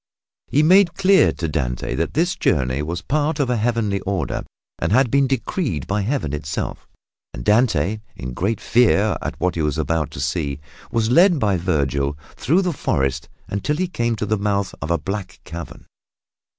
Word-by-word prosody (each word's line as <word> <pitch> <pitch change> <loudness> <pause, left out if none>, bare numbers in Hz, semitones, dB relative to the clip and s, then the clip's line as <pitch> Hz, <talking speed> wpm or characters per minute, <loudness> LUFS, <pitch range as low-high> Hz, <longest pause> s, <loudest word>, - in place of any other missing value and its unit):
He 150 - +2
made 180 +2 +5
clear 195 0 +5
to 85 +2 -3
Dante 60 -6 -2
that 85 - -2
this 175 +4 +2
journey 65 -4 +1
was 85 +4 -3
the - - -30
part 150 +1 0
of 130 -3 +1
a 120 - +1
Heavenly 110 -3 0
order 95 -7 -2 0.4
and - - -1
had 125 +1 +3
been 140 -1 +3
decreed 130 - -2
by 100 +2 -1
Heaven 105 - -1
itself, 75 0 -4 0.5
and - - -7
Dante, 105 - +2 0.2
in 65 0 -6
great 100 - -1
fear 110 -3 +3
at - - -5
what 90 - +1
he 85 - -2
was 75 0 0
about 80 -2 0
to - - -9
see, 70 0 -2 0.3
was 115 0 +1
led 175 +5 +6
by 105 -7 +1
Vergil 70 -5 0 0.2
through 170 +9 +2
the 180 -2 0
forest 70 - -1 0.2
until 100 +9 -1
he 185 +2 0
came 120 -9 -1
to 105 - -3
the 105 0 0
mouth 100 -1 0
of 70 - -4
a 85 - +2
black 95 +3 -5
cavern. 85 +1 -8
100 Hz, 185 wpm, -21 LUFS, -, 0.5 s, led